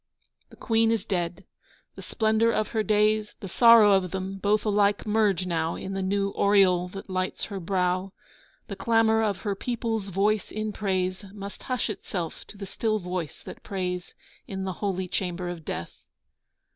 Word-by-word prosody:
The - - -15
Queen 225 -1 +2
is 225 -3 0
dead. 180 -1 -2 0.5
The - - -10
splendour 220 0 +2
of 215 - 0
her 220 - 0
days, 215 +1 +2
The 195 - -7
sorrow 230 +1 +7
of 190 -2 +3
them 190 +1 -4
both 210 +2 +1
alike 205 -1 +2
merge 210 -4 +2
now 165 -2 -1
In 195 - -6
the 195 - -2
new 200 +1 0
aureole 190 -3 +4
that 195 +2 -9
lights 185 -1 -2
her 195 - -3
brow. 185 +1 0 0.6
The 200 - -5
clamour 220 +2 +3
of 205 -3 -1
her 205 -2 -1
people's 225 -1 -3
voice 205 +3 +1
in 215 0 -3
praise 185 -1 -1
Must 200 0 -8
hush 255 -1 -2
itself 175 -5 -5
to 205 - -13
the 200 - -6
still 215 +3 -1
voice 180 -4 -5
that - - -10
prays 180 -2 -4 0.3
In 190 -1 -4
the 190 -1 -2
holy 190 -3 -1
chamber 180 -1 -3
of 175 -2 -6
Death. 85 - -5
195 Hz, 170 wpm, -26 LUFS, 185-215 Hz, 0.6 s, sorrow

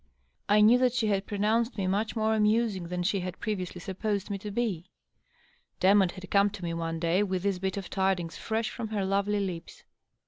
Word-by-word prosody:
I 210 +1 +5
knew 230 +4 +6
that 250 -2 +3
she 230 -3 +1
had 195 -1 0
pronounced 220 +3 0
me 195 - -1
much 205 +5 0
more 220 0 +1
amusing 215 -4 +1
than 180 0 -3
she 195 +2 +1
had 180 -1 -5
previously 185 -5 -3
supposed 200 +2 -3
me 200 - -3
to 210 - -6
be; 195 -5 -2 0.9
De 190 +2 +5
motte 195 -4 +4
had 190 -1 -10
come 200 0 +4
to 200 -2 -9
me 170 -1 -2
one 165 0 -3
day 170 +3 +2
with 190 -3 -1
this 200 -2 0
bit 190 +1 -2
of 195 -3 -4
tidings 190 -3 -1
fresh 220 0 -2
from 235 -3 -5
her 210 -3 -2
lovely 200 +2 +1
lips. 180 -4 -5
200 Hz, 210 wpm, -28 LUFS, 185-215 Hz, 0.9 s, knew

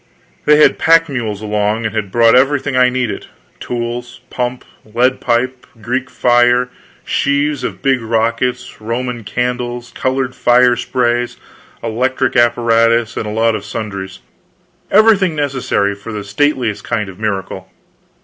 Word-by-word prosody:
They 150 - +6
had 150 - +4
pack 165 0 +4
mules 110 -6 -4
along, 105 +1 -1
and 110 - -2
had 105 -3 -2
brought 115 0 +4
everything 135 +1 +2
I 125 0 +5
needed 125 -5 -3 0.3
tools, 120 0 -5
pump, 125 0 -3 0.2
lead 120 +4 0
pipe, 125 +1 -1
Greek 125 +4 -3
fire, 120 0 +3 0.4
sheaves 145 0 0
of - - -5
big 135 -3 +2
rockets, 115 +2 -1
roman 120 +1 -3
candles, 125 +2 -3
colored 130 0 -1
fire 125 0 +4
sprays, 120 0 -1 0.5
electric 130 +3 -1
apparatus, 115 -1 +3
and 105 - -3
a - - -3
lot 115 +1 +1
of - - -5
sundries 100 - -6 0.7
everything 205 -6 +4
necessary 130 -8 0
for 100 +3 -9
the 105 -2 -5
stateliest 120 +1 0
kind 105 -2 -2
of 95 0 -11
a - - -14
miracle. 95 -3 -3
120 Hz, 140 wpm, -16 LUFS, 110-130 Hz, 0.7 s, They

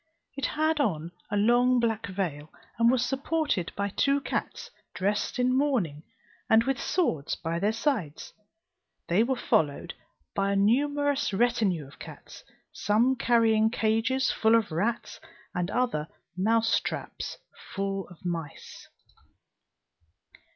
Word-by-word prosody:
It 275 -2 -1
had 310 0 0
on 170 - -1 0.2
a 205 - -1
long 245 +4 +4
black 225 -2 0
veil, 170 -7 -4 0.3
and 230 0 +5
was 250 -1 +2
supported 275 - -1
by 200 0 -1
two 275 +7 +2
cats - - -4 0.2
dressed 205 +2 -1
in 250 0 +2
mourning, 240 - 0 0.5
and 220 +1 +6
with 270 -1 -1
swords 165 - 0
by 165 +1 -3
their 205 +4 +2
sides: 220 - -2 0.8
they 175 +5 +4
were 260 +3 +1
followed 150 - 0 0.4
by 200 0 0
a - - 0
numerous 285 +5 +2
retinue 205 -8 +1
of 135 -1 -16
cats, - - -11 0.3
some 230 +6 +2
carrying 225 -3 +3
cages 225 +4 +1
full 220 0 +3
of 225 -6 +1
rats 225 +9 -2 0.3
and 180 0 -2
others 240 -12 0 0.3
mousetraps 225 +4 0 0.4
full 195 -1 -2
of 180 0 -16
mice. 165 -4 -6
220 Hz, 125 wpm, -27 LUFS, 185-255 Hz, 0.8 s, and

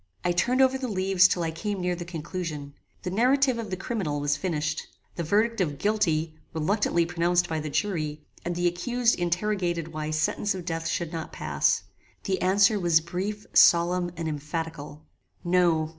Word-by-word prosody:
I 175 - +3
turned 250 +9 +3
over 265 0 +2
the 260 - -3
leaves 190 -3 +4
till 175 - -1
I 165 - -1
came 200 +5 -3
near 180 0 0
the 175 0 -6
conclusion. 160 -3 -5 0.3
The 180 - -3
narrative 255 +4 +3
of 220 -3 -5
the 185 - -3
criminal 190 - -2
was 145 0 +1
finished. 155 -2 -2 0.3
The - - -3
verdict 215 +6 +1
of 150 -5 -1
GUILTY 165 -6 +1 0.2
reluctantly 170 +1 +1
pronounced 175 +1 +1
by 160 -1 -2
the 155 0 -4
jury, 155 -4 -2 0.2
and 175 0 -3
the 175 +1 -1
accused 235 +7 +1
interrogated 175 -2 -1
why 155 -1 -4
sentence 160 +6 0
of 180 -2 -7
death 165 -1 -3
should 170 -1 -2
not 165 -1 -5
pass. - - 0 0.4
The 190 -3 -1
answer 200 +3 +4
was 170 -3 +4
brief, 190 +6 -4
solemn, 175 +1 +5
and 165 -1 -3
emphatical. 150 0 -5 0.4
"No. 175 -3 +3
175 Hz, 175 wpm, -26 LUFS, 160-200 Hz, 0.4 s, solemn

